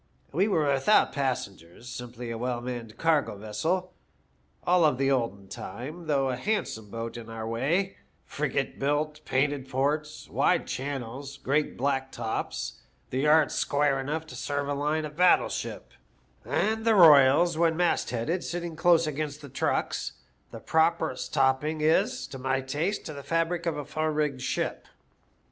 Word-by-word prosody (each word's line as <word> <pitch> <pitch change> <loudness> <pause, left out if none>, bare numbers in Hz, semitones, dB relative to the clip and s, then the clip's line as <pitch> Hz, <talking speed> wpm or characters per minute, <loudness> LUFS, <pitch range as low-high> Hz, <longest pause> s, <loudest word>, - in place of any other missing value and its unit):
We 185 +7 +2
were 160 -8 +2
without 135 +11 +4
passengers, 115 - -4
simply 120 -1 -7
a 115 - -4
well 125 0 -1
manned 120 -2 -6
cargo 155 -10 +1
vessel, 170 - -2 0.7
all 180 0 +4
of 150 -5 +3
the 135 +1 +2
olden 115 -7 -1
time, 140 - -7
though 135 -3 +2
a - - -1
handsome 125 - -2
boat 115 +2 -5
in 115 -1 -9
our 110 0 -5
way, 155 +12 0 0.3
frigate 140 -2 -2
built, 150 +2 -1
painted 135 0 0
ports, 150 +3 -1
wide - - +2
channels, 135 +1 -5
great 145 +3 0
black 135 0 0
tops, 115 -2 -4 0.3
the 130 - -1
yards 150 +1 +4
square 145 -1 +1
enough 150 +4 -3
to 155 - -10
serve 145 -1 -2
a 145 - 0
line 150 +2 0
of 150 0 -8
battle 180 +2 +5
ship, - - -5 0.5
and 220 +1 0
the 225 -1 +4
royals, 155 -1 +7
when 165 0 +2
mast 175 -1 +1
headed, 125 +10 -1
sitting 175 -1 -4
close 165 0 +4
against 150 0 -3
the 145 - -9
trucks 130 - -1 0.2
— - - -40
the - - -8
properest 160 -5 +1
topping 150 +4 +2
oS, 160 - +2
to 135 - -9
my 130 +1 0
taste, 150 +10 -2
to 155 - -5
the 140 - -7
fabric 165 +3 -1
of 160 -3 0
a 145 - -4
full 155 +2 -2
rigged 150 -4 -1
ship. 130 - -2
145 Hz, 160 wpm, -28 LUFS, 130-160 Hz, 0.7 s, royals